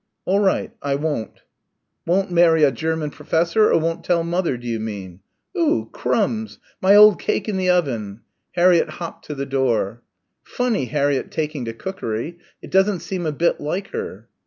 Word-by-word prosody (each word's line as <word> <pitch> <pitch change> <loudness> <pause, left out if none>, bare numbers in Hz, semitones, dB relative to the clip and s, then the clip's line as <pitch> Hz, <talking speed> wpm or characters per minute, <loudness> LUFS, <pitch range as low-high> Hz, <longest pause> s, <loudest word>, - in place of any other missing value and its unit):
"All 195 +2 +2
right. 195 -2 +1
I 140 -1 0
won't." 145 -7 -3 0.6
"Won't 190 +2 +1
marry 170 -2 +5
a 140 - +5
German 160 -1 -2
professor, 170 +10 +2
or - - +4
won't 165 +1 -2
tell 170 -2 +1
mother, 170 -5 -1
do 120 - -12
you 115 -1 -2
mean?... 100 -5 -6 0.4
Oo 335 -2 +1
Crumbs! 220 -1 -1 0.2
My 195 +2 +6
old 210 -2 +8
cake 205 - -1
in 210 - -1
the 185 -1 0
oven!" 120 - 0 0.3
Harriett 175 -2 +4
hopped 170 -1 -7
to 150 - -6
the 140 0 -3
door. 120 -5 0 0.4
"Funny 245 - -1
Harriett 140 0 0
taking 150 -5 -3
to 115 - -4
cookery. 155 - -5 0.2
It - - -10
doesn't 190 -1 +3
seem 180 -4 -3
a - - 0
bit 165 +4 +1
like 180 +7 -3
her." 455 0 -6
165 Hz, 170 wpm, -21 LUFS, 135-190 Hz, 0.6 s, old